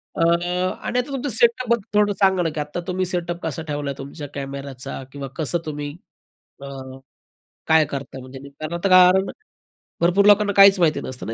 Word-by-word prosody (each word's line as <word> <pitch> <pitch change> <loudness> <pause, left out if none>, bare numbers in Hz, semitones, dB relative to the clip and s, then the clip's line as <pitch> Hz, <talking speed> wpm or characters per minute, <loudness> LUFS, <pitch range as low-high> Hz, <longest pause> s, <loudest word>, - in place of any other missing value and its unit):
अ, - - -3
आणि 180 +7 0
आता 250 - -2
तुमचं 275 +1 -3
सेटअप 235 +1 +2
बद्दल 210 -3 +1
थोडं 205 0 +2
सांगा 190 -2 +3
ना, 165 - 0
की 150 - -6
आता 150 +3 -4
तुम्ही 185 0 -1
सेटअप 175 -1 -3
कसा 160 0 -4
ठेवला 145 -2 -3
तुमच्या 140 +2 -8
कॅमेऱ्याचा, 135 -1 -6
किंवा 140 -1 -7
कसं 160 +1 0
तुम्ही 145 -1 -5 0.7
अ, - - -7 1.0
काय 160 -1 +5
करता, 135 -1 -6
म्हणजे 130 +1 -11
कारण 155 +4 -7
आता, 175 +3 -1
कारण 185 +1 +6 0.7
भरपूर 180 +4 +3
लोकांना 205 0 +5
काहीच 195 -1 +8
माहिती 160 -3 +2
नसतं 130 -1 -7
ना 115 - -3
170 Hz, 175 wpm, -21 LUFS, 145-195 Hz, 1.0 s, काहीच